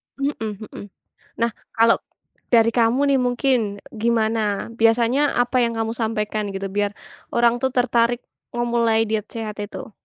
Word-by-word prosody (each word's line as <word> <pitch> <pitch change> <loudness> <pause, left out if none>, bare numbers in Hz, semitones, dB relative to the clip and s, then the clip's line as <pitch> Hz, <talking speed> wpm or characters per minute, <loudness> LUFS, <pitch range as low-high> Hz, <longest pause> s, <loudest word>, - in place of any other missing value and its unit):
Hmm 280 +1 -1
hmm. 215 -1 -6 0.6
Nah, 235 0 +2 0.2
kalo 230 0 +4 0.5
dari 230 -1 +4
kamu 235 +3 +2
nih 270 - +3
mungkin, 250 +1 +2 0.3
gimana, 220 -2 0
biasanya 235 +5 +3
apa 245 +1 0
yang 230 -1 0
kamu 225 0 -1
sampaikan, 215 -2 -2
gitu, 195 0 -3
biar 205 0 -1 0.4
orang 235 0 +3
tuh 265 - +2
tertarik 240 -1 +2 0.3
memulai 235 -2 +2
diet 215 -1 -1
sehat 215 -2 -6
itu? 220 +4 -6
230 Hz, 135 wpm, -22 LUFS, 220-240 Hz, 0.6 s, kalo